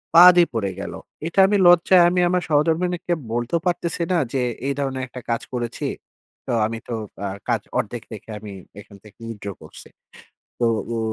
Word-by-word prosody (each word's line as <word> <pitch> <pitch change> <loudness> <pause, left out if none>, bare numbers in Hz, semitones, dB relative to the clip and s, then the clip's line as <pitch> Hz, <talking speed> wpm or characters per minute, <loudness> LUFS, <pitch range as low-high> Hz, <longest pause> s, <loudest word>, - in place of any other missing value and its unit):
বাদই 175 0 +9
পড়ে 105 -4 -1
গেলো 100 - -6 0.3
এটা 170 +4 -1
আমি 205 +1 +2
লজ্জায় 175 +1 +6
আমি 180 - 0
আমার 180 0 +1
সহধর্মণীকে 170 +4 +1 0.2
বলতেও 120 +8 -1
পারতেছি 170 -1 -1
না 180 - +3 0.2
যে, 130 - +1 0.3
"এই 140 - +1
ধরনের 135 -2 -2
একটা 125 0 -9
কাজ 115 - 0
করেছি।" 120 -2 -3 0.6
তো - - -3
আমি 115 +1 -3
তো 120 - -4 0.3
আ - - -1 0.2
কাজ - - +1 0.2
১/২ - - -2
দেখে - - -11
আমি 105 -1 -9 0.3
এখান 100 0 -14
থেকে 105 +1 -17
withdraw 100 -4 -6
করছি। - - -13 0.7
তো 120 - +3 0.3
ও - - -1
140 Hz, 175 wpm, -22 LUFS, 115-175 Hz, 0.7 s, বাদই